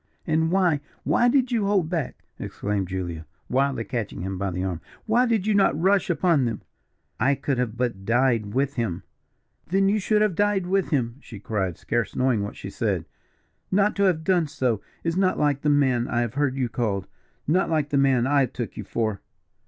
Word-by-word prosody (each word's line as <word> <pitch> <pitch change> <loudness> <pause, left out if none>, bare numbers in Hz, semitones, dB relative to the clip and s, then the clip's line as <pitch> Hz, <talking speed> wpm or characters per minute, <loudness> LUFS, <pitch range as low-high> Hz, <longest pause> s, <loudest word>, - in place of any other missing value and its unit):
"And 160 +1 +1
why, 180 -5 +3 0.2
why 240 - +3
did 260 -1 +2
you 225 -4 +1
hold 195 -5 +2
back?" 165 -6 -3 0.2
exclaimed 100 -2 -3
Julia, 85 -4 -5 0.2
wildly 135 -2 +1
catching 115 -6 -4
him 95 +1 -3
by 100 0 -1
the 90 0 -3
arm, 90 -4 -3 0.2
"why 240 +3 +3
did 220 -5 +1
you 215 - +2
not 195 -7 +3
rush 190 +2 +2
upon 165 -4 +2
them?" 115 -3 -3 0.6
"I 140 +2 +3
could 125 -5 -2
but 125 0 +1
have 95 - -16
died 115 0 +2
with 140 +1 +1
him." 115 -10 -2 0.6
"Then 195 +3 +2
should 215 +2 0
you 210 - +4
have 210 -3 +1
died 205 0 +1
with 190 +1 0
him," 125 -5 -1
she 115 -7 -11
cried, 95 -5 -2
scarce 120 -3 -2
knowing 125 -5 +2
what 100 - -5
she - - -8
said. - - -1 0.7
"Not 200 +2 +3
to 200 - +3
have 170 -4 +2
done 175 -3 +2
so, 130 -7 -1 0.2
is 165 +1 -1
not 190 -1 +2
like 145 -2 +1
the 150 - +1
man 130 -4 +2
I 120 - 0
have 120 -2 -2
heard 140 -2 0
you 130 -2 0
called 105 -5 -2 0.4
not 175 +6 +2
like 155 -3 0
the 145 - +1
man 130 -3 +3
I 140 -1 +3
took 120 -2 -6
you - - -4
for." 110 -4 -2
140 Hz, 200 wpm, -25 LUFS, 115-180 Hz, 0.7 s, you